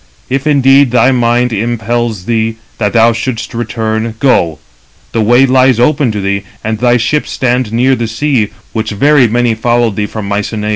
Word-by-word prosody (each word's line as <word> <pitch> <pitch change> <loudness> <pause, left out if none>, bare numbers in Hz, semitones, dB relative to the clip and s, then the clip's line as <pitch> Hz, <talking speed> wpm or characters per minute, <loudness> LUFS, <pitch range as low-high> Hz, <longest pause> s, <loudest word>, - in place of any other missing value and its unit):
If 135 +3 -1
indeed 140 -1 +4
thy 125 +2 +3
mind 120 -1 +1
impels 115 -2 -2
thee, 115 0 -1 0.2
that 105 -3 -1
thou 115 0 +4
shouldst 115 0 -4
return, 115 -1 -3
go: 85 - +1 0.5
the 115 - -1
way 120 +5 +4
lies 130 -2 +3
open 140 0 +2
to 105 - -3
thee, 100 0 -1 0.2
and 110 -1 -3
thy 125 0 +3
ships 125 +6 -1
stand 125 -3 -1
near 125 +4 +2
the 115 -1 -3
sea, 115 -1 -1 0.2
which 110 -1 -2
very 135 +5 +3
many 120 +1 +1
followed 120 -1 0
thee 105 -1 -1
from 110 -2 -6
Mycenæ. 105 +1 -3
120 Hz, 175 wpm, -12 LUFS, 110-125 Hz, 0.5 s, indeed